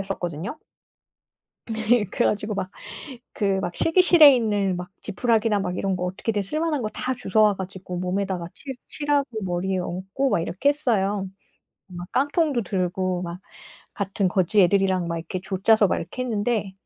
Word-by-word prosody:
했었거든요. 195 - -4 1.1
네. 220 0 +2
그래 - - 0
가지고 210 +1 -1
막 185 - -3 0.6
그 195 -3 0
막 175 - -4
실기실에 330 -4 +6
있는 205 -5 0
막 180 0 -6
지푸라기나 220 0 +1
막 180 -1 -3
이런 195 -1 0
거 180 - -3
어떻게든 205 +3 -2
쓸만한 305 - -1
거 215 - -2
다 255 - -2
주워 215 -1 +1
와 210 -1 +5
가지고 190 -1 -6
몸에다가 185 -1 -2
칠 265 +4 -7
칠하고 290 -2 0 0.2
머리에 185 +1 -1
얹고 190 +10 -2
막 - - +2
이렇게 180 +12 +1
했어요. 205 -9 0 0.6
막 175 -1 -9
깡통도 290 -2 +1
들고 185 -1 -1
막 175 +1 -6 0.5
같은 195 -1 -1
거지 190 +2 +2
애들이랑 185 -1 +3
막 170 0 -2
이렇게 180 +2 -5
조 190 -1 -4
짜서 220 -2 +5
막 - - +1
이렇게 185 +10 -5
했는데 215 -4 -1
195 Hz, 335 characters per minute, -24 LUFS, 185-230 Hz, 1.1 s, 실기실에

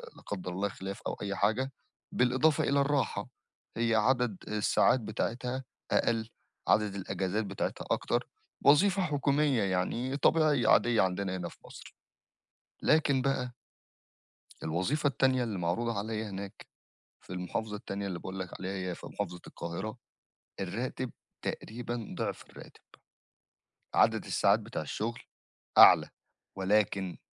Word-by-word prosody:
لا - - -15
قدّر 90 -3 -4
الله 100 +3 -1
خِلاف 95 0 -7
أو - - -2
أي 100 -1 -2
حاجة. 110 +7 +1 0.4
بالإضافة 130 +5 +3
إلى 140 +1 +2
الراحة 140 -6 0 0.5
هي 115 -1 +2
عدد 120 -2 +2
الساعات 105 +4 +3
بتاعتها 125 +4 -3 0.3
أقل، 115 -1 +1 0.4
عدد 105 -2 +3
الأجازات 95 +2 -2
بتاعتها 100 0 -3
أكتر. - - 0 0.4
وظيفة 190 +7 +6
حكومية 145 -5 +2
يعني، 115 +8 -1
طبيعية 150 -6 +3
عادية 120 -2 +5
عندنا 95 0 0
هنا 85 -1 -4
في - - -16
مصر. - - -12 0.9
لكن 145 -4 +3
بقى 125 -2 -1 1.1
الوظيفة 95 - 0
التانية 130 -1 +2
اللي 105 -6 -3
معروضة 100 +7 -1
عليَّ 110 +1 -2
هناك 100 -1 -7 0.6
في - - -17
المحافظة 105 +4 -3
التانية 100 0 -5
اللي 90 -3 -3
باقول 95 +2 -6
لك 90 - -4
عليها، 95 +1 -3 0.2
هي - - -3
في - - -11
محافظة 90 -4 -4
القاهرة، 95 +8 -5 0.6
الرّاتب 120 +6 -3 0.3
تقريبًا 120 0 -5
ضِعف - - -3
الراتب، - - -13 1.1
عدد - - +3
الساعات - - +3
بتاع - - -5
الشغل 115 +3 -3 0.6
أعلى، - - +9 0.5
ولكن 95 -1 +1
110 Hz, 125 wpm, -31 LUFS, 95-130 Hz, 1.1 s, أعلى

